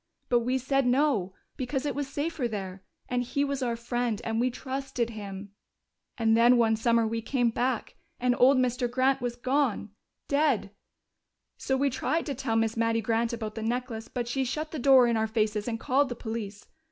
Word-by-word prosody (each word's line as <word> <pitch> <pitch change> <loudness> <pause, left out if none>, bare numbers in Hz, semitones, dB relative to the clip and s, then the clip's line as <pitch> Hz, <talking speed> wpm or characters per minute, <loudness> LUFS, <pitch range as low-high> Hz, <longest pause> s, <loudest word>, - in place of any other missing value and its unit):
But 240 - +4
we 250 +3 0
said 270 0 +1
no, 245 -8 +1 0.2
because 265 +1 -2
it 290 - -1
was 285 -1 -3
safer 290 -1 -2
there, 195 -4 -6 0.3
and 250 0 0
he 255 +3 -1
was 280 -1 -2
our 240 -2 0
friend, 235 -1 -2
and 225 0 -1
we 250 +2 +2
trusted 260 -2 -3
him. 200 -2 -8 0.7
"And 225 -2 +3
then 240 +2 +6
one 225 -2 +3
summer 230 +1 +2
we 225 +1 -2
came 240 0 +1
back, 245 0 -2 0.2
and 245 0 +2
old 265 +2 +6
Mr. 250 -1 +1
Grant 260 +2 +2
was 245 -1 -2
gone. 255 -4 0 0.4
Dead. 280 -8 +1 0.9
So 265 - 0
we 280 +1 +1
tried 320 +6 -1
to 285 - -2
tell 250 -3 -2
Miss 225 0 +1
Mattie 230 0 +1
Grant 230 +1 0
about 220 -2 -4
the 225 - -6
necklace, 230 0 -3
but 245 -2 -4
she 265 +3 0
shut 305 +5 -3
the 310 - -4
door 260 -1 +6
in 235 -1 +1
our 220 0 +1
faces 215 -1 -1
and 225 -1 -2
called 270 +3 +2
the 245 - -4
police. 220 -3 -6
245 Hz, 195 wpm, -28 LUFS, 225-265 Hz, 0.9 s, then